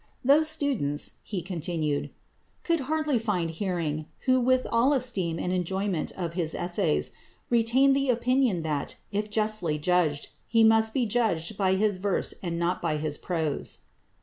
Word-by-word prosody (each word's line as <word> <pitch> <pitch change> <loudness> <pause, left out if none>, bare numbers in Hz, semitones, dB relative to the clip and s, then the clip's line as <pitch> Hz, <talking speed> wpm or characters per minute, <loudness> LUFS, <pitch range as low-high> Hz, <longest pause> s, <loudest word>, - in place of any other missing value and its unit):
"Those 305 +4 +5
students," 265 - -1
he 190 -5 -5
continued, 165 -4 -2 0.5
"could 335 -1 +1
hardly 305 -5 +1
find 185 -7 -1
hearing, 165 -4 -2 0.2
who 255 0 +4
with 255 +1 +2
all 240 +5 +4
esteem 200 - 0
and 180 +2 -2
enjoyment 185 0 -1
of 170 -3 -4
his 170 -3 -1
essays... 75 - 0 0.4
retained 245 +4 +4
the 275 -1 0
opinion 245 -6 +2
that, 150 -3 -2 0.2
if 210 +1 -2
justly 210 -7 0
judged, 155 -2 +1 0.2
he 225 -1 +4
must 220 0 +5
be 255 -3 +2
judged 210 -5 0
by 190 -1 +2
his 205 0 +1
verse 195 +1 -1
and 170 -2 -3
not 170 +1 -1
by 155 -3 0
his 150 -1 -2
prose." 160 -5 -3
190 Hz, 150 wpm, -27 LUFS, 165-240 Hz, 0.5 s, Those